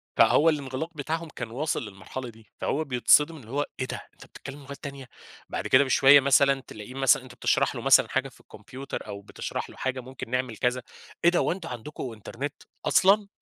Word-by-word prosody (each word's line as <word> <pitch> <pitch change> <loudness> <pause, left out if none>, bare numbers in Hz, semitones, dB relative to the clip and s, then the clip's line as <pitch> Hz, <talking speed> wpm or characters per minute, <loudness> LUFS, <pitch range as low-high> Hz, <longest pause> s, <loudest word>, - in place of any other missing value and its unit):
فهو 160 +3 +5
الانغلاق 145 +1 -3
بتاعهم 160 +3 -3
كان 115 - -5
واصل 140 0 -2
للمرحلة 105 +6 -7
دي، 110 -3 -18
فهو 155 - 0
بيتصدم 145 +4 +4
إن 125 -7 -14
هو 140 +5 -1
إيه 130 - 0
ده - - -5
أنت - - -15
بتتكلم 140 +1 -10
لغات 140 +1 -9
تانية؟ 140 -3 -7 0.4
بعد - - -3
كده 130 +2 +6
بشوية 135 +1 +7
مثلًا 140 0 +4
تلاقيه 105 +4 -9
مثلًا 135 -1 +3
أنت 125 -1 -13
بتشرح - - +1
له - - -5
مثلًا - - +6
حاجة - - -1
في - - -21
الكمبيوتر 135 +2 -8
أو 100 0 -7
بتشرح - - -6
له - - -13
حاجة 130 0 -2
ممكن 130 -1 -9
نعمل 125 -2 -2
كذا، 125 +3 0 0.4
إيه 170 - +7
ده 175 - +2
هو - - +1
أنتم 170 -2 -5
عندكم 125 +1 -6
إنترنت؟! 130 +6 -7 0.2
أصلًا! 200 +2 +4
135 Hz, 195 wpm, -26 LUFS, 125-145 Hz, 0.4 s, بشوية